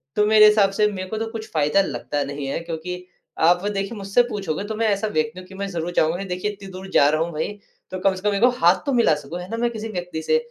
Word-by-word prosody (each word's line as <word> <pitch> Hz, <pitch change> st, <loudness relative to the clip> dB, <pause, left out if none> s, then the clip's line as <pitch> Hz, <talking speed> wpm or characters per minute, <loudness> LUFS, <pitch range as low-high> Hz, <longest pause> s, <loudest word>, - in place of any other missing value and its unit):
तो 210 Hz, -, +3 dB
मेरे 215 Hz, 0 st, +7 dB
हिसाब 210 Hz, -2 st, +5 dB
से 210 Hz, +2 st, +2 dB
मेरे 185 Hz, -2 st, -5 dB
को 220 Hz, -, -3 dB
तो 225 Hz, +1 st, -2 dB
कुछ 220 Hz, -1 st, -7 dB
फ़ायदा 150 Hz, +4 st, +3 dB
लगता 140 Hz, -3 st, -2 dB
नहीं 140 Hz, 0 st, -5 dB
है, 135 Hz, -, -2 dB
क्योंकि 170 Hz, +2 st, -6 dB, 0.3 s
आप 175 Hz, +3 st, +4 dB
देखिए 200 Hz, +2 st, -3 dB
मुझसे 200 Hz, +5 st, +2 dB
पूछोगे 200 Hz, -7 st, -3 dB
तो 220 Hz, -, -4 dB
मैं 225 Hz, +1 st, +1 dB
ऐसा 200 Hz, +1 st, 0 dB
व्यक्ति 155 Hz, -3 st, -1 dB
हूँ 185 Hz, -, -12 dB
कि 190 Hz, -, -12 dB
मैं 200 Hz, +1 st, -3 dB
ज़रूर 170 Hz, -1 st, -3 dB
चाहूँगा 175 Hz, +3 st, +1 dB
देखिए 185 Hz, +2 st, -3 dB
इतनी 200 Hz, -1 st, -11 dB
दूर 190 Hz, +1 st, -9 dB
जा 140 Hz, -, +5 dB
रहा 155 Hz, +1 st, +1 dB
हूँ 170 Hz, +1 st, -1 dB
भई 155 Hz, +5 st, -2 dB, 0.4 s
तो 185 Hz, -, -4 dB
कम 190 Hz, 0 st, +2 dB
से 185 Hz, -, -8 dB
कम 200 Hz, -, 0 dB
एक 195 Hz, -, -1 dB
बार 245 Hz, +1 st, +6 dB
हाथ 175 Hz, +2 st, +4 dB
तो 280 Hz, -, 0 dB
मिला 235 Hz, -10 st, +4 dB
सकूँ 150 Hz, +4 st, -7 dB
है 180 Hz, +2 st, -8 dB
ना, 230 Hz, -, -3 dB
मैं 240 Hz, +1 st, +1 dB
किसी 225 Hz, -1 st, -6 dB
व्यक्ति 180 Hz, -5 st, -4 dB
से? 470 Hz, -, +3 dB
190 Hz, 280 wpm, -22 LUFS, 165-210 Hz, 0.4 s, मेरे